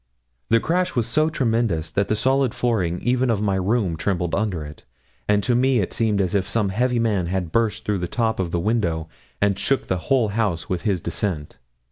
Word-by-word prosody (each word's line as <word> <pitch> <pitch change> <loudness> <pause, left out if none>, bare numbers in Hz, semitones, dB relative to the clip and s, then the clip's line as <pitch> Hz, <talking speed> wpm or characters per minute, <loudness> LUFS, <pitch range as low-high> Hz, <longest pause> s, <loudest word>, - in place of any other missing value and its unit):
The 115 - +5
crash 180 +7 0
was 120 -3 +1
so 155 +8 +2
tremendous 115 - 0
that 100 +5 0
the 110 - +1
solid 130 +2 +1
flooring 95 -8 0
even 125 +1 +1
of 110 -4 +1
my 100 -2 0
room 95 -1 0
trembled 90 0 -1
under 95 -7 -1
it, 75 +1 -11 0.4
and 105 -1 +2
to 120 - +1
me 130 +1 +3
it 95 - -2
seemed 110 -3 +1
as 95 -3 0
if 95 -2 0
some 105 -4 +1
heavy 125 +5 +1
man 105 -6 +1
had 90 -2 -2
burst 115 -2 0
through 105 -2 0
the 90 - -2
top 115 +2 -1
of 90 -2 -1
the 85 - -1
window, 85 -6 0 0.3
and 100 -1 +2
shook 135 - 0
the 95 - -1
whole 130 -6 +3
house 100 -6 -1
with 90 - -2
his 95 -4 0
descent. 85 -3 -3
105 Hz, 210 wpm, -22 LUFS, 90-115 Hz, 0.4 s, The